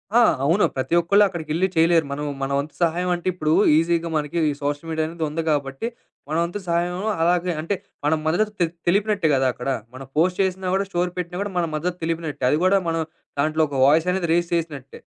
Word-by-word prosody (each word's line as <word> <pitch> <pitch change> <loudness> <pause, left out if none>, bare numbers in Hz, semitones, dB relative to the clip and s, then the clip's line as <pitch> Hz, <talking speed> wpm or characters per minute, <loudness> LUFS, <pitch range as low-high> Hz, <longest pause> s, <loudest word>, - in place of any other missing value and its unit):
ఆ! - - +7 0.2
అవును. 170 +9 +3
ప్రతి 135 +5 0
ఒక్కళ్ళు 200 +5 +4
అక్కడికెళ్లి 170 0 -1
చేయలేరు. 165 0 +4
మనం 145 +1 -3 0.2
మన 135 - -2
వంతు 145 +2 -5
సహాయం 175 +2 +1
అంటే 175 +1 -7
ఇప్పుడు, 155 -3 0 0.2
ఈజీగా 170 +1 +1
మనకి 150 +2 -3
ఈ - - -3
సోషల్ 145 +2 -2
మీడియా 160 -1 0
అనేది 165 0 -5
ఉంది 160 +2 -2
గాబట్టి, 140 +5 -1 0.4
మన 155 - 0
వంతు 175 +4 -4
సహాయం 175 +1 0 0.3
అలాగే 175 +1 +2
అంటే, 165 +6 -1 0.3
మన 150 - +3
మద్దతు 210 +6 +1
తె - - +5 0.2
తెలిపినట్టే 200 -2 +2
గదా! 130 -1 +2
అక్కడ. 125 +3 -5 0.3
మనం 135 0 -9
పోస్ట్ 180 +4 +2
చేసినా 185 -1 -2
గూడా, 195 0 0
స్టోరీ 175 0 0
పెట్టినా 180 0 -4
గూడా, 205 0 -3
మన 170 - 0
మద్దతు 175 +4 -2
తెలిపినట్టే. 165 -4 -3
అది 150 - +2
గూడా 195 +1 +4
మనం 165 0 0 0.4
దాంట్లో 155 +2 +1
ఒక 140 - -6
వాయిస్ 155 +5 +4
అనేది 180 -2 -1
రెయిస్ 170 0 +1
చేసినట్టే. 145 -5 -5
165 Hz, 200 wpm, -23 LUFS, 155-180 Hz, 0.4 s, ఆ